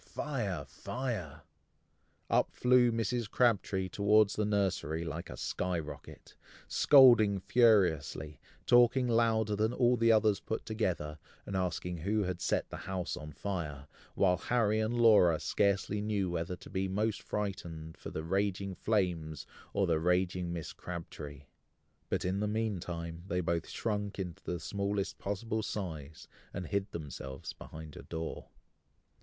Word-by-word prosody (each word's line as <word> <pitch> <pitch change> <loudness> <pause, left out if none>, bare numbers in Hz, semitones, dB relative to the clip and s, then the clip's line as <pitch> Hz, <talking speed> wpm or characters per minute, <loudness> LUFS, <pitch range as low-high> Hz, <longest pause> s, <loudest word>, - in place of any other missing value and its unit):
fire! 105 - -3
fire!" 100 - -5 0.8
Up - - +2
flew 125 -1 +4
Mrs. 115 0 -1
Crabtree 105 -6 +2
towards 105 +2 +4
the 105 - 0
nursery 95 -6 0
like 85 +1 -5
a - - -8
sky 90 -1 -2
rocket, 75 -2 -9 0.3
scolding 120 -8 +6
furiously, 90 - +2 0.3
talking 125 +1 +5
louder 115 -2 +2
than 110 +2 +1
all 125 0 +3
the 115 0 +4
others 110 -2 +4
put 110 - -4
together, 85 -9 -2 0.3
and 100 - -5
asking 90 -1 -2
who 105 +6 0
had 90 -2 -3
set - - 0
the - - -5
house 95 -1 -3
on 75 0 -8
fire, 75 -6 -4 0.3
while 90 -2 +3
Harry 110 +1 +1
and 110 +2 0
Laura 100 -8 +6
scarcely 100 0 +1
knew 100 -4 -1
whether 85 +1 -2
to - - -13
be 95 0 -1
most 105 +3 -1
frightened 85 -6 -4
for - - -8
the 80 - -5
raging 100 +2 -1
flames, 90 -8 -1 0.3
or 100 -1 +1
the 80 -3 +2
raging 90 +1 +1
Mrs. 85 -2 -6
Crabtree; 75 -5 -7 0.7
but, - - -1
in 95 +2 0
the 105 - 0
meantime, 90 -6 -3
they 90 0 0
both 85 -1 -1
shrunk 105 -3 -2
into 90 -4 -5
the 90 - -3
smallest 100 +1 -2
possible 110 +3 -2
size, 80 -8 -5 0.3
and 90 - -3
hid 100 +3 -1
themselves 70 -5 -7
behind 80 -2 -10
a - - -8
door. 80 -1 -6
95 Hz, 145 wpm, -32 LUFS, 85-110 Hz, 0.8 s, scolding